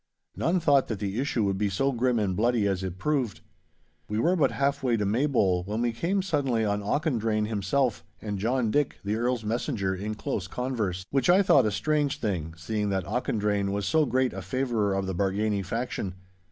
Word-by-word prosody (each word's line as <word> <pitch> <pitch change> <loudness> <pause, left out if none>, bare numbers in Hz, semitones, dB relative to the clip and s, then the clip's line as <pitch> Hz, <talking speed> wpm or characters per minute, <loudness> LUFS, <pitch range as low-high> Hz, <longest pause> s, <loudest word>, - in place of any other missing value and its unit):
None 180 +3 +1
thought 145 -5 +3
that 110 - -3
the 100 +3 -3
issue 130 -4 0
would 100 -1 0
be 105 -1 +1
so 135 +9 +1
grim 125 -1 +1
and 100 -4 0
bloody 115 0 +2
as 95 -2 0
it 95 -1 -4
proved. 130 -1 -1 0.7
We 105 - -1
were 170 +11 +3
but 145 -7 +3
half 140 +1 0
way 125 -3 +1
to 105 - 0
Maybole 105 -6 +2
when 105 +3 -2
we 120 - +1
came 185 - -1
suddenly 135 - 0
on 105 0 0
Auchendrayne 110 -3 0
himself 115 +4 0 0.2
and 105 -2 -4
John 115 +1 +1
Dick, 145 +1 +1
the 105 +2 0
Earl's 120 0 0
messenger, 110 -3 -1
in 105 +3 -4
close 95 -3 -3
converse—which 120 - -2
I 190 +3 +6
thought 135 - +5
a - - 0
strange 145 +4 0
thing, 85 -7 -2
seeing 105 +4 -2
that 95 -2 -1
Auchendrayne 105 -3 0
was 100 0 -2
so 155 +3 +3
great 130 0 +1
a - - -5
favourer 120 -7 0
of 95 0 -1
the 95 - -3
Bargany 100 +2 0
faction. 100 -2 -3
110 Hz, 195 wpm, -27 LUFS, 100-135 Hz, 0.7 s, I